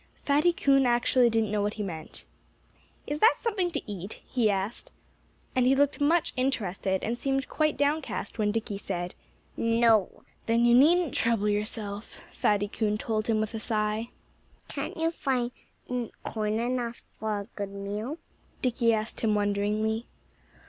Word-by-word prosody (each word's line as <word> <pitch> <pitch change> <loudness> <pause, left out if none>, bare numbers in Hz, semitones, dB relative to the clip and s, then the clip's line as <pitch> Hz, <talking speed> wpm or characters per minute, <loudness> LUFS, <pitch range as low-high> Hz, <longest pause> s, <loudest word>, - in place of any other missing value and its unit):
Fatty 295 +5 +4
Coon 275 -5 +3
actually 240 0 +4
didn't 225 -2 +1
know 210 -1 +1
what 205 +1 -1
he 210 - -3
meant. 160 -5 -7 0.8
"Is 295 +1 -3
that 450 +7 +6
something 400 -6 0
to 340 - -3
eat?" 200 -1 -6
he 235 -4 +1
asked. 200 - -2 0.7
And 255 -1 +3
he 265 - +5
looked 285 +1 +2
much 320 +3 +3
interested, 200 -7 -1
and 235 +2 -2
seemed 270 -1 0
quite 305 -1 0
downcast 290 -3 -1
when 210 -1 +2
Dickie 215 -2 -3
said 175 -3 -4 0.4
"No!" 230 -3 +3 0.2
"Then 230 +1 +3
you 240 - +5
needn't 320 +5 +5
trouble 225 -2 +1
yourself," 210 0 -3
Fatty 205 0 +1
Coon 210 0 -1
told 215 -1 -2
him 225 -2 +2
with 215 +1 -2
a 225 - -3
sigh. 215 +1 -1 0.6
"Can't - - -5
you 325 0 +1
find 255 -6 -1 0.7
corn 215 0 -1
enough 240 0 -2 0.2
for 215 -1 -1
a - - -8
good 200 -1 -3
meal?" 205 +8 -4 0.5
Dickie 235 -2 +3
asked 215 +1 -3
him 215 -2 +2
wonderingly. 210 +2 0
225 Hz, 155 wpm, -28 LUFS, 210-260 Hz, 0.8 s, that